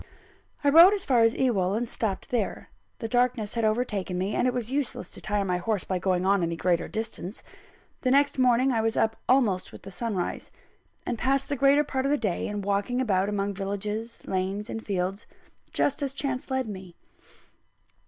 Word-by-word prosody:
I 285 - +4
rode 340 +7 +8
as 395 - -4
far 245 -4 +3
as 225 0 +4
Ewell, 200 -7 +1
and 235 +2 -1
stopped 210 -4 -3
there: 230 -5 -2 0.3
the 225 - -4
darkness 245 -3 +1
had 230 - -1
overtaken 215 -5 0
me, 190 +3 -1
and 250 - +2
it - - +2
was 245 -1 -3
useless 280 -1 -2
to - - -8
tire 205 -1 -1
my 180 -1 0
horse 200 +2 -1
by 185 -1 -2
going 185 0 0
on 195 0 +3
any 170 0 -1
greater 175 0 0
distance. 220 -3 -5 0.6
The 255 - +1
next 280 +1 +3
morning, 255 +1 +4
I 230 -3 +1
was 225 0 0
up 225 0 +2
almost 230 -8 +2
with 195 - -10
sunrise; 190 -1 -3 0.6
and 235 - -3
passed 275 +2 +1
the 285 - 0
greater 275 +2 +4
part 265 -2 -2
of 275 - +1
the 295 - +3
day 205 -9 -1
in 205 -1 -4
walking 205 +5 0
about 200 -6 +1
among 200 -1 -1
villages, 210 +4 -4
lanes, 195 +3 -2
and 225 - -5
fields, 195 +1 -2 0.4
just 285 - 0
as 275 -1 -2
chance 270 -2 -3
led 260 -2 -1
me. 185 -4 -8
220 Hz, 195 wpm, -27 LUFS, 195-255 Hz, 0.6 s, rode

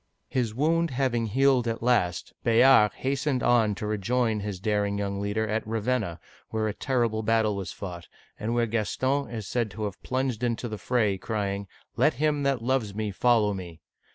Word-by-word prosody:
His 115 -4 -1
wound 165 +5 +2
having 125 -4 0
healed 130 +1 +3
at 115 0 -3
last, 90 -8 +1
Bayard 115 -2 +6
hastened 135 -1 -1
on 110 -4 +3
to 105 - -5
rejoin 110 +2 0
his 100 -2 -4
daring 100 0 0
young 100 -1 -2
leader 105 +2 -1
at 110 +1 -1
Raven'na, 110 -5 -1 0.3
where 110 -1 -1
a 105 - -2
terrible 115 -3 0
battle 110 -1 +2
was 95 -2 -4
fought, 90 -3 -7 0.3
and 115 +2 -2
where 120 -1 +2
Gaston 130 +5 -1
is 110 -3 -5
said 115 +2 -1
to 105 +1 -6
have 100 -2 -4
plunged 130 -3 -2
into 120 0 -1
the 110 -2 -6
fra.y, 105 -6 +1
crying, 100 -2 -2 0.2
" - - -48
Let - - +3
him 150 +1 +1
that 135 -4 0
loves 120 -5 0
me 105 -1 -2
follow 110 0 +3
me!" 90 -4 -8
110 Hz, 180 wpm, -27 LUFS, 105-125 Hz, 0.3 s, Bayard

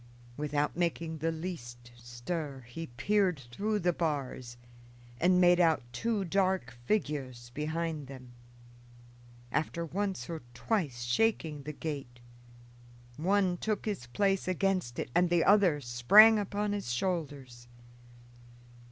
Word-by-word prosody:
Without 150 0 -1
making 165 -2 -2
the 165 +2 0
least 120 -8 -7
stir 130 +4 -5
he 120 +7 -8
peered 185 +7 +1
through 210 - -1
the 175 -3 +1
bars 135 -7 -3 0.6
and 180 +3 +4
made 175 0 +5
out 165 -6 +3
two 215 - -1
dark 185 -8 0
figures 130 - -2
behind 155 0 -3
them. 130 -2 -11 1.2
After 170 +2 -1
once 190 -5 -3
or 165 -1 -5
twice 140 - -1
shaking 155 - 0
the 150 +2 -6
gate, 140 -5 -6 1.0
one 185 +3 +1
took 215 +2 -2
his 200 - -3
place 195 +9 0
against 185 -8 0
it - - -4
and 175 0 +3
the 175 -1 +3
other 195 -7 +4
sprang 170 - +7
upon 205 +1 -2
his 200 -12 -3
shoulders. 135 -5 -3
165 Hz, 120 wpm, -31 LUFS, 130-190 Hz, 1.2 s, sprang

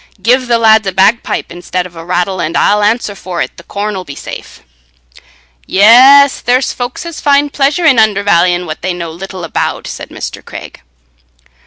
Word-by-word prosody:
Give 250 +6 +1
the 235 -1 +2
lads 220 -2 +3
a - - 0
bagpipe 195 +5 0
instead 175 +1 -4
of 175 -1 -12
a 165 - -9
rattle, 180 +1 -2
and 165 +2 -2
I'll 210 0 +2
answer 210 0 0
for 185 -3 -7
it - - -3
the 170 - -13
corn 205 +2 -4
'll 185 - -5
be 145 -5 -10
safe." - - -10 1.1
"Yes, 260 +7 +6
there's 250 +2 0
folks 245 +6 -6
as 335 -2 -7
find 285 0 +2
a - - -34
pleasure 290 +5 0
in 280 -6 +5
undervallying 190 -4 +2
what 155 -2 -7
they 180 0 -3
know 170 -2 -6
but - - -15
little 190 -1 -8
about," 165 - -3
said - - -8
Mr. - - -7
Craig. - - -11
205 Hz, 190 wpm, -12 LUFS, 180-245 Hz, 1.1 s, Yes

